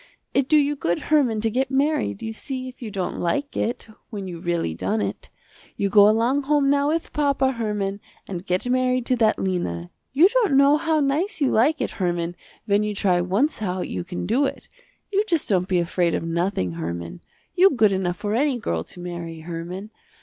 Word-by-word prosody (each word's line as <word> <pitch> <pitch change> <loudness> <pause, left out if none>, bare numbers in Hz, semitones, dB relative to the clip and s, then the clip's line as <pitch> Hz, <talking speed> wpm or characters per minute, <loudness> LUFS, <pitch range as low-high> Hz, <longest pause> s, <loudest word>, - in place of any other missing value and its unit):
It 275 -1 +1
do 310 - +6
you 295 0 +2
good 175 -11 0 0.2
Herman 245 -8 +3
to 225 0 +1
get 265 +3 0
married, 270 - 0
you 225 - -4
see 260 +3 -5
if 255 0 -11
you 230 - -5
don't 190 -3 -3
like 280 +12 -1
it, 235 - -2 0.2
when 200 -4 -6
you 175 -2 -7
really 170 - -1
done 95 +6 -1
it. 100 0 -4 0.5
You 200 - 0
go 205 +1 +7
along 235 +6 +2
home 285 -1 +3
now 285 0 +2
with 320 +2 -1
papa, 280 -3 +2
Herman 210 -4 -2 0.3
and 180 -2 -5
get 185 +4 -1
married 255 0 +1
to 255 - +2
that 220 -2 +3
Lena. 90 - -2 0.2
You 305 +7 +6
don't 425 - +2
know 280 +2 +6
how 315 0 +1
nice 305 +9 0
you 280 -3 +2
like 290 +8 +3
it - - -1
Herman 175 -1 -1 0.3
when 200 0 +2
you 210 -1 -2
try 180 -3 +2
once 205 - 0
how 185 -3 -2
you 90 - -4
can 90 0 -5
do 270 - +2
it. - - -5 0.5
You 400 +2 +3
just 335 -6 +1
don't 185 -3 +1
be 185 - +1
afraid 170 0 +1
of - - -2
nothing, 165 - -1
Herman. 85 - -5 0.3
You 375 +2 +6
good 220 - +3
enough 185 -2 -1
for 205 -1 -3
any 270 +2 +2
girl 85 - -2
to 175 - -12
marry, 170 -2 -6
Herman. 175 +5 -6
210 Hz, 205 wpm, -23 LUFS, 175-275 Hz, 0.5 s, go